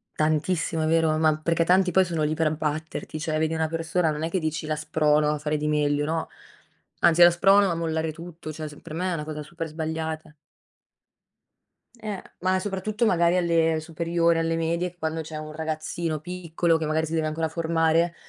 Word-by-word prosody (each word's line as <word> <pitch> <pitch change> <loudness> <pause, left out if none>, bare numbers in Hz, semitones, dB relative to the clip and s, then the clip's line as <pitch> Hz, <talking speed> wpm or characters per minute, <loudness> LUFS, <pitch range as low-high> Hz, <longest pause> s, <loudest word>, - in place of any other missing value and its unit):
Tantissimo 155 +1 0
vero? 160 -1 +2
Ma 155 -1 +3
perché 165 +2 +1
tanti 185 +2 +3
poi 190 +2 +5
sono 170 -3 -2
lì 150 +1 +1
per 160 0 +1
abbatterti, 155 0 -3
cioè 155 0 -1
vedi 160 +1 0
una 160 -1 0
persona, 165 +1 0
non 150 +1 -4
è 165 - -1
che 185 - 0
dici: 160 -1 -3
"La 155 0 -1
sprono 150 0 +2
a 150 - -1
fare 150 +1 -2
di 150 0 -2
meglio." 145 -1 +1
No 160 +1 -2 0.7
anzi: 170 +1 +4
"La 175 - +8
sprono 195 +3 +5
a - - -1
mollare 160 -1 -1
tutto." 165 0 -9
Cioè 155 0 -6
s 145 -1 -11
per 160 - -9
me 180 +3 -1
è - - 0
una 155 -3 -3
cosa 150 0 -6
super 165 +2 -6
sbagliata. 160 0 -4 1.7
Eh, 210 -3 -4 0.2
ma 185 +1 +1
soprattutto 205 +3 -2
magari 175 -4 +3
alle 165 -2 +2
superiori, 170 +1 +1
alle 165 0 0
medie. 170 +2 -1
Quando 160 -1 -2
c'è 160 0 -6
un 155 0 -6
ragazzino 155 0 -3
piccolo, 170 -1 0
che 160 - -3
magari 155 +1 0
si 160 - -6
deve 160 -1 +1
ancora 160 +1 -2
formare, 165 +1 +1
160 Hz, 195 wpm, -25 LUFS, 155-170 Hz, 1.7 s, La